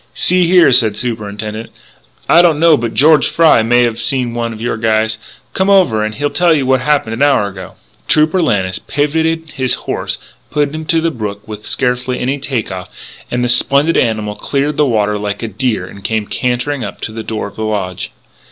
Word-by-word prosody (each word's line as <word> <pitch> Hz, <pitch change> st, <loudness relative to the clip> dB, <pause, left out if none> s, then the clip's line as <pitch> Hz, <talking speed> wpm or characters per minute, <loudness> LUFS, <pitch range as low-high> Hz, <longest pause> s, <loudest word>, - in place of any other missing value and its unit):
"See 180 Hz, -1 st, +4 dB
here," 175 Hz, -5 st, +5 dB
said 115 Hz, -4 st, +4 dB
the -, -, -8 dB
Superintendent, 110 Hz, -1 st, -5 dB, 0.6 s
"I 170 Hz, -, +6 dB
don't 165 Hz, -4 st, +3 dB
know 165 Hz, -1 st, +5 dB
but 115 Hz, -3 st, -4 dB
George 155 Hz, +2 st, +5 dB
Fry 160 Hz, -8 st, +4 dB
may 120 Hz, +2 st, +3 dB
have 115 Hz, -2 st, -1 dB
seen 125 Hz, -3 st, 0 dB
one 120 Hz, -1 st, -2 dB
of 110 Hz, -, -9 dB
your 115 Hz, +1 st, -2 dB
guys. 110 Hz, 0 st, 0 dB, 0.3 s
Come 190 Hz, +1 st, 0 dB
over 175 Hz, -, +3 dB
and 110 Hz, 0 st, -3 dB
he'll 145 Hz, +1 st, -2 dB
tell 175 Hz, -2 st, +3 dB
you 140 Hz, -3 st, 0 dB
what 130 Hz, -1 st, +2 dB
happened 140 Hz, -5 st, 0 dB
an 115 Hz, -, -5 dB
hour 140 Hz, -8 st, +3 dB
ago." 95 Hz, -2 st, -10 dB, 0.3 s
Trooper 155 Hz, +4 st, +3 dB
Lannis 95 Hz, -, 0 dB
pivotted 160 Hz, +2 st, -1 dB
his 130 Hz, -3 st, 0 dB
horse -, -, -2 dB
and -, -, -25 dB
put 145 Hz, -1 st, -1 dB
him 155 Hz, 0 st, -5 dB
to 165 Hz, +1 st, +1 dB
the 165 Hz, 0 st, 0 dB
brook 105 Hz, -5 st, -6 dB
with 105 Hz, -1 st, -8 dB
scarcely 125 Hz, 0 st, -1 dB
any 135 Hz, +3 st, -1 dB
take 130 Hz, -7 st, -3 dB
off; 90 Hz, -1 st, -7 dB, 0.4 s
and 125 Hz, 0 st, -1 dB
the -, -, +1 dB
splendid 140 Hz, +5 st, +3 dB
animal 110 Hz, -2 st, 0 dB
cleared 140 Hz, +6 st, -2 dB
the 150 Hz, -, +3 dB
water 105 Hz, -3 st, 0 dB
like 105 Hz, +1 st, -4 dB
a -, -, -2 dB
deer 110 Hz, -2 st, -2 dB
and 100 Hz, +1 st, -12 dB
came 110 Hz, 0 st, -1 dB
cantering 125 Hz, +4 st, -2 dB
up 100 Hz, -, -7 dB
to -, -, -4 dB
the 110 Hz, +1 st, -6 dB
door 110 Hz, 0 st, -4 dB
of -, -, -13 dB
the -, -, -7 dB
lodge. 100 Hz, -4 st, -3 dB
125 Hz, 210 wpm, -15 LUFS, 110-145 Hz, 0.6 s, I